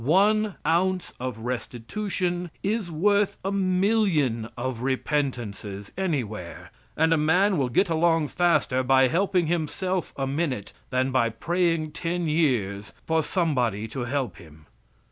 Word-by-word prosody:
One 205 Hz, -, +3 dB
ounce 180 Hz, +2 st, +1 dB
of 125 Hz, -3 st, -4 dB
restitution 175 Hz, -, -3 dB
is 205 Hz, -2 st, -1 dB
worth 200 Hz, +5 st, +2 dB
a 195 Hz, -, 0 dB
million 185 Hz, -, +1 dB
of 120 Hz, -1 st, -3 dB
repentances 120 Hz, -7 st, -2 dB
anywhere, 120 Hz, -, -3 dB, 0.3 s
and 160 Hz, +1 st, +4 dB
a -, -, +3 dB
man 180 Hz, +4 st, +3 dB
will 130 Hz, -2 st, +1 dB
get 190 Hz, +11 st, +3 dB
along 165 Hz, -2 st, +2 dB
faster 150 Hz, -7 st, +2 dB
by 130 Hz, 0 st, +4 dB
helping 185 Hz, +2 st, +2 dB
himself 175 Hz, +3 st, -1 dB
a 135 Hz, -, -1 dB
minute 135 Hz, -, -2 dB, 0.2 s
than 130 Hz, +1 st, +1 dB
by 125 Hz, -3 st, +2 dB
praying 165 Hz, +5 st, 0 dB
ten 170 Hz, +2 st, -2 dB
years 120 Hz, -, 0 dB
for 160 Hz, 0 st, +2 dB
somebody 125 Hz, -, 0 dB
to 125 Hz, +1 st, -4 dB
help 130 Hz, 0 st, -2 dB
him. 80 Hz, -3 st, -15 dB
155 Hz, 130 wpm, -26 LUFS, 125-180 Hz, 0.3 s, and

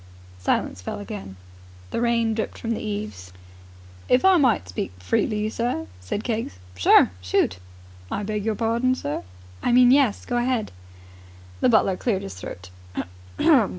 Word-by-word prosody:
Silence 90 Hz, 0 st, 0 dB
fell -, -, -5 dB
again. 205 Hz, -, -7 dB, 0.6 s
The -, -, -1 dB
rain 230 Hz, -1 st, +2 dB
dripped 220 Hz, 0 st, -3 dB
from 230 Hz, -, -3 dB
the 225 Hz, -, -2 dB
eaves. 205 Hz, -, -5 dB, 0.8 s
"If 250 Hz, +8 st, +4 dB
I 380 Hz, -1 st, +7 dB
might 250 Hz, -, +3 dB
speak 90 Hz, 0 st, -4 dB
freely, 210 Hz, -, 0 dB
sir.. 230 Hz, -10 st, -1 dB
.?" 90 Hz, -, -21 dB
said 90 Hz, -, -3 dB
Keggs. 225 Hz, -, -3 dB, 0.2 s
"Sure. 90 Hz, 0 st, +5 dB
Shoot!" 90 Hz, -1 st, +1 dB, 0.5 s
"I 205 Hz, -, -2 dB
beg 210 Hz, 0 st, -2 dB
your 220 Hz, 0 st, 0 dB
pardon, 235 Hz, +4 st, +1 dB
sir?" 145 Hz, -, -3 dB, 0.4 s
"I -, -, +1 dB
mean, 245 Hz, 0 st, +7 dB
yes. 270 Hz, -6 st, +3 dB
Go 245 Hz, -, -1 dB
ahead!" 240 Hz, -2 st, 0 dB, 0.9 s
The -, -, +4 dB
butler 195 Hz, -5 st, +3 dB
cleared 205 Hz, -4 st, 0 dB
his 95 Hz, -, -6 dB
throat. 90 Hz, 0 st, -9 dB
215 Hz, 150 wpm, -24 LUFS, -, 0.9 s, I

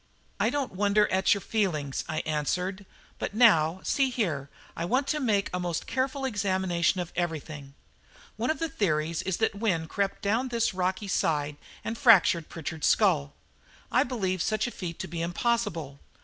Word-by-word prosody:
"I -, -, +3 dB
don't 285 Hz, -2 st, -2 dB
wonder 205 Hz, +2 st, +3 dB
at 190 Hz, +2 st, +3 dB
your 200 Hz, -, -5 dB
feelings," 165 Hz, -11 st, -1 dB
I 155 Hz, -1 st, -1 dB
answered; 180 Hz, +6 st, -2 dB, 0.3 s
"but -, -, -4 dB
now, 185 Hz, -7 st, +5 dB
see 275 Hz, -2 st, +2 dB
here, 165 Hz, -, -2 dB, 0.3 s
I 165 Hz, -, -3 dB
want 255 Hz, +10 st, +1 dB
to 305 Hz, -, +1 dB
make 210 Hz, -7 st, +1 dB
a 180 Hz, -, -1 dB
most 175 Hz, -2 st, -2 dB
careful 265 Hz, +1 st, -1 dB
examination 190 Hz, -6 st, +1 dB
of 175 Hz, -1 st, -4 dB
everything. 155 Hz, -5 st, -4 dB, 0.6 s
One 230 Hz, +4 st, -2 dB
of 315 Hz, -, +1 dB
the 330 Hz, -, -1 dB
theories 165 Hz, -, 0 dB
is 190 Hz, -2 st, -2 dB
that 220 Hz, -, +1 dB
Wynne 195 Hz, -6 st, -1 dB
crept 200 Hz, +3 st, -2 dB
down 225 Hz, +6 st, +1 dB
this 235 Hz, -5 st, 0 dB
rocky 185 Hz, +2 st, -1 dB
side 150 Hz, -5 st, 0 dB, 0.3 s
and 225 Hz, -, -3 dB
fractured 190 Hz, -, +5 dB
Pritchard's 160 Hz, -1 st, -3 dB
skull. 70 Hz, 0 st, +3 dB, 0.6 s
I -, -, +4 dB
believe 190 Hz, -8 st, -1 dB
such 215 Hz, +3 st, 0 dB
a 240 Hz, -, -3 dB
feat 170 Hz, -6 st, -6 dB
to 190 Hz, -, -5 dB
be 170 Hz, -1 st, -4 dB
impossible. 175 Hz, -, -1 dB
190 Hz, 170 wpm, -28 LUFS, 165-225 Hz, 0.6 s, now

